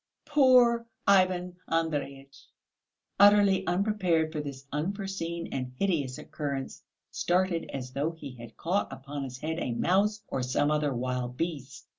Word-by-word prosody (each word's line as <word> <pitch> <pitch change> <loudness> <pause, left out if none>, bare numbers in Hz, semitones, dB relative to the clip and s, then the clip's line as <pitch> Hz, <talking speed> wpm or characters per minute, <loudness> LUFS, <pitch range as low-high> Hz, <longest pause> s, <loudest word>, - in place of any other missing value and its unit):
Poor 250 -5 +5 0.2
Ivan 185 -2 +3
Andreyitch, 140 -4 -3 0.7
utterly 200 -1 +6
unprepared 180 -4 +1
for 155 -2 -3
this 140 -2 -7
unforeseen 170 +1 -3
and 130 -1 -3
hideous 145 -9 0
occurrence, 140 -3 -5 0.3
started 175 -1 0
as 130 -2 -5
though 140 +4 -1
he 160 -5 -9
had 120 -2 -12
caught 185 +5 -1
upon 140 +1 -6
his 130 -2 -6
head 160 +4 -3
a 125 - -2
mouse 205 - +1
or 135 - -2
some 130 +4 +1
other 150 -1 +1
wild 125 0 -3
beast. 140 -5 -4
160 Hz, 135 wpm, -29 LUFS, 135-190 Hz, 0.7 s, utterly